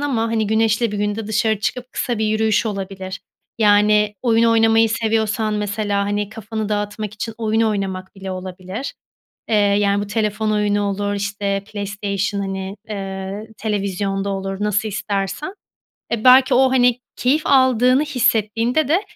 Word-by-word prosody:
ama, 275 -6 0
hani, 225 -1 0
güneşli 220 +1 +1
bir 205 - -3
günde 205 +1 -2
dışarı 220 0 +1
çıkıp 250 +4 -3
kısa 240 -4 -2
bir 220 - +1
yürüyüş 220 +1 +1
olabilir. 195 -2 -5 0.4
Yani, 210 0 +4
oyun 230 -2 +3
oynamayı 225 0 +4
seviyorsan 220 -1 0
mesela, 205 -1 -1
hani, 205 0 -1
kafanı 220 0 -5
dağıtmak 210 0 -3
için 220 +2 -5
oyun 220 -1 0
oynamak 195 -4 -2
bile 195 -1 -7
olabilir. 185 +5 -6 0.6
Eee, 220 - +3
yani, 200 -1 +2
bu - - -8
telefon 215 0 -1
oyunu 205 -1 +1
olur, 205 0 -1
işte, 200 0 -2
PlayStation, 200 -1 -3
hani, 195 0 -4
eee, 195 +1 -5
televizyon 195 -2 -2
da - - -1
olur, 195 0 -3
nasıl 210 +1 0
istersen. 200 - -3 0.6
Eee, 235 0 -2
belki 260 +1 +7
o, 260 +1 +4
hani, 250 -1 +3 0.2
keyif 275 +5 +2
aldığını 260 0 +4
hissettiğinde 245 0 +1
de 340 +7 +2
210 Hz, 145 wpm, -20 LUFS, 200-225 Hz, 0.6 s, belki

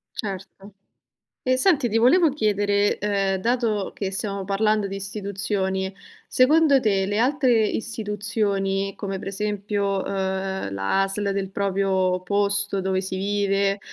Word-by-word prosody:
Certo. 195 0 -6 0.7
E 255 0 +2
senti 280 -3 +3
ti 220 - +1
volevo 305 +9 +5
chiedere, 205 -6 +1
ehm, 195 -2 0
dato 225 -2 0
che 195 -2 -3
stiamo 195 0 -3
parlando 210 +1 +1
di 195 - -5
istituzioni, 195 -1 -2 0.4
secondo 285 +2 +4
te 200 -5 +1
le 205 +1 -1
altre 250 -2 +3
istituzioni 205 -3 -1
come 195 -2 -4
per 195 - -6
esempio, 200 0 -2
uhm, 190 - -3
la 100 - 0
ASL 200 +1 -2
del 195 -1 -2
proprio 190 -2 0
posto 200 0 +1
dove 190 0 0
si 190 0 -4
vive, 200 0 0
200 Hz, 130 wpm, -23 LUFS, 195-215 Hz, 0.7 s, volevo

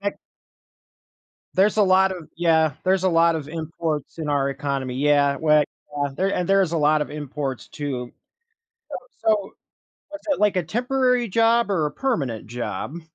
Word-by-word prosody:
Eh 200 0 -2 1.4
There's 200 +3 +3
a 215 - +5
lot 190 0 +4
of 175 -4 -9
yeah, 160 -2 +3
there's 190 0 +2
a - - +4
lot 165 -1 +3
of 150 -2 -6
imports 160 -2 -4
in 155 -2 -4
our 140 -1 +1
economy 135 -2 -3
yeah. 145 0 +3
We 155 +1 +1
yeah, 150 -1 +6 0.5
there 190 +1 +1
and 180 - -2
there's 195 -3 +3
a - - +1
lot 150 +1 +3
of - - -7
imports 145 -3 -5
too. 130 -5 -5 0.8
So - - -4 0.3
so, 210 -3 +2 0.6
was 300 - -7
it - - 0
like 210 -2 +3
a 185 - +2
temporary 250 - +1
job 230 +1 +2
or 165 -6 +1
a - - -6
permanent 140 - -2
job? 125 +7 -5
165 Hz, 170 wpm, -23 LUFS, 145-195 Hz, 1.4 s, yeah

